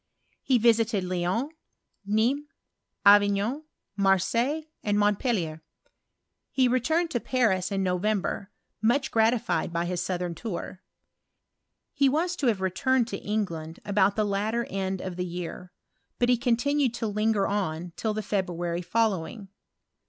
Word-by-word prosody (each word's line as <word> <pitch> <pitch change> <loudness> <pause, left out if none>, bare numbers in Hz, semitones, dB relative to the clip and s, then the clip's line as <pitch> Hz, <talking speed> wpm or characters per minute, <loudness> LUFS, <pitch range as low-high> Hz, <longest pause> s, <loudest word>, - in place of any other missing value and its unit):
He 260 - +3
visited 225 -3 +3
Lyons, 185 - -1 0.6
Nismes, 245 +8 +1 0.6
Avignon, 205 +7 +4 0.3
Marseilles, 200 - +2 0.2
and 205 -1 +1
Montpellier. 205 - 0 0.9
He 260 -2 +3
returned 315 +8 +1
to 240 - 0
Paris 215 -8 +1
in 195 -1 0
November, 190 +1 -1 0.3
much 245 +5 +2
gratified 225 -4 +1
by 170 0 -1
his 175 0 -2
southern 180 -2 -2
tour. 185 -1 -6 1.1
He 280 -3 +3
was 340 +6 0
to 275 - 0
have 210 -5 +1
returned 235 +6 +1
to 195 - -4
England 170 -7 -3
about 200 -1 +2
the 215 - +1
latter 215 +4 -1
end 190 -1 -2
of 185 -2 -5
the 180 - -1
year; 180 0 -6 0.5
but 245 - +2
he 250 - +6
continued 250 +2 +1
to 235 - -3
linger 215 -1 +1
on 175 -4 -2
till 215 -2 -2
the 215 - -2
February 175 -4 -2
following. 195 +1 -1
205 Hz, 130 wpm, -27 LUFS, 185-240 Hz, 1.1 s, he